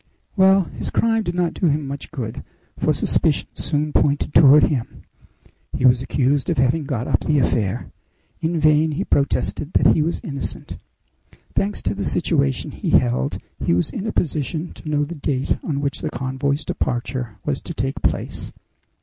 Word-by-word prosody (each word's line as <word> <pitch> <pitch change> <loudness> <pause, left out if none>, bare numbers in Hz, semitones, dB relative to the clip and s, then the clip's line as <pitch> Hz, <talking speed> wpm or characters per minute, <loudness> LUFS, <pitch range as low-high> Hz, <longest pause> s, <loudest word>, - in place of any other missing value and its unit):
"Well, 190 -1 +5
his - - -6
crime 225 -1 +2
did 175 -4 -3
not 175 -2 0
do 180 - 0
him 150 -1 0
much 140 +1 -6
good, 120 -8 -5 0.3
for - - +1
suspicion - - +1
soon 150 0 -1
pointed 145 0 +1
toward 145 +2 +7
him. 125 -6 -1 0.7
He 130 - 0
was 125 -1 +5
accused 135 +1 0
of - - 0
having 130 +4 +2
got 130 -3 -3
up - - +2
the 150 - +1
affair. 110 -7 0 0.5
In 165 0 -1
vain 155 0 +3
he - - -1
protested 145 +2 0
that - - +5
he - - +2
was 165 +3 -1
innocent. 140 - -6 0.8
Thanks 205 +1 -1
to 100 - 0
the 100 0 -4
situation 70 -7 0
he - - -4
held, 65 +2 +2 0.3
he 85 - +2
was 90 - 0
in 205 - -4
a - - -1
position 155 +1 -2
to 155 - -7
know 150 -1 +1
the 150 +4 -5
date 140 -3 -1
on 140 -3 -2
which 140 -2 -2
the - - -2
convoy's 135 +3 -2
departure 120 -2 -3
was 145 -2 -1
to 170 - -7
take 135 -1 -2
place. - - -2
145 Hz, 175 wpm, -21 LUFS, 130-160 Hz, 0.8 s, toward